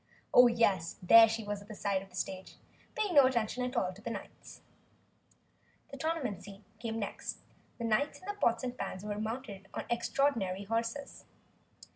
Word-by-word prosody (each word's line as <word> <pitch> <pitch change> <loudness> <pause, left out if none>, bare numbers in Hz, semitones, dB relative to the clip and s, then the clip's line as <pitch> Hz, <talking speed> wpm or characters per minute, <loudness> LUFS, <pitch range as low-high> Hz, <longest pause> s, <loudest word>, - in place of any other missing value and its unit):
Oh, 245 0 +9
yes, 205 -8 +1
there 225 +4 +9
she 225 0 -2
was 205 -1 -4
at 200 - -14
the 215 - -8
side 200 -2 0
of 195 - -13
the 180 - -15
stage, 185 0 -5 0.4
paying 415 -4 0
no 280 -4 +8
attention 245 -1 -1
at 250 +1 -3
all 185 -4 0
to 200 - -15
the 230 - -5
knights. 230 - -9 1.3
The 275 - -7
tournament 270 - -2
scene 200 +1 -12
came 225 -1 -3
next. 205 -3 -4 0.4
The 235 - -5
knights 230 +7 +1
in - - -16
their 410 - -3
pots 235 - +1
and 250 -1 -3
pans 185 -5 -5
were 210 0 -3
mounted 215 -3 -5
on - - -3
extraordinary 235 -6 0
horses. 230 +6 -3
225 Hz, 180 wpm, -32 LUFS, 200-250 Hz, 1.3 s, Oh